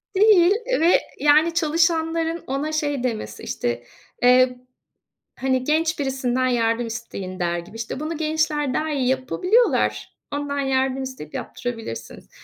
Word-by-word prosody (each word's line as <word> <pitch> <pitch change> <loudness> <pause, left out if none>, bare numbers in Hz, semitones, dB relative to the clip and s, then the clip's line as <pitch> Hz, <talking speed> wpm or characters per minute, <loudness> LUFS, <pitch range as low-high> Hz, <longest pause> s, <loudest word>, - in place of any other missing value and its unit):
Değil, 390 -3 +6 0.2
eee, - - +1
ve 335 +3 +4 0.2
yani 305 +3 +4
çalışanların 330 0 +1
ona 280 +4 -2
şey 290 -4 -1
demesi, 215 - -4
işte, 120 0 -3 0.4
eee, 250 0 +5 0.8
hani, 260 -1 +1
"Genç 315 +3 +1
birisinden 260 -2 0
yardım 230 -1 +1
isteyin." 200 -5 -6
der 175 -1 0
gibi, 175 +6 -12
işte, 225 +4 -5
"Bunu 310 +1 -4
gençler 305 -3 0
daha 315 0 -1
iyi 270 -4 0
yapabiliyorlar. 360 - +1 0.2
Ondan 285 0 -2
yardım 265 0 0
isteyip 260 - -8
yaptırabilirsiniz." 225 - -6
270 Hz, 130 wpm, -23 LUFS, 245-315 Hz, 0.8 s, Değil